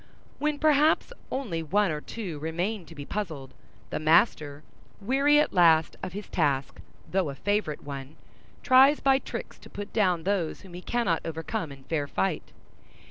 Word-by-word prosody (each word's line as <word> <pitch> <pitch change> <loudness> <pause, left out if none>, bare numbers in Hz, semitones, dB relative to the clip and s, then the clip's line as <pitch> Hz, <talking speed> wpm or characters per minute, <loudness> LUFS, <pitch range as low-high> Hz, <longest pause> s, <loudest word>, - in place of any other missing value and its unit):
When 300 0 0
perhaps 310 +8 +3 0.2
only 220 -12 -2
one 195 +4 +1
or 150 -1 -3
two 180 -8 -6
remain 175 +5 -3
to 165 - -12
be 145 -1 -7
puzzled, 155 -9 -5 0.4
the - - -2
master, 155 -2 +2 0.4
weary 275 +7 +3
at 300 - +1
last 165 -3 +4
of 180 - -5
his 205 +1 -6
task, 140 -5 -1 0.3
though 185 -5 +1
a 140 - -6
favorite 205 -4 -1
one, 140 0 -7 0.5
tries 270 +2 +6
by 270 -1 +3
tricks - - -7
to - - -14
put 205 0 -8
down 180 -6 +2
those 185 -4 -1
whom 190 -3 -14
he 180 - -7
cannot 195 -7 0
overcome 165 +1 -4
in 135 -1 -12
fair 145 0 -2
fight. 180 +3 -2
180 Hz, 165 wpm, -27 LUFS, 155-220 Hz, 0.5 s, tries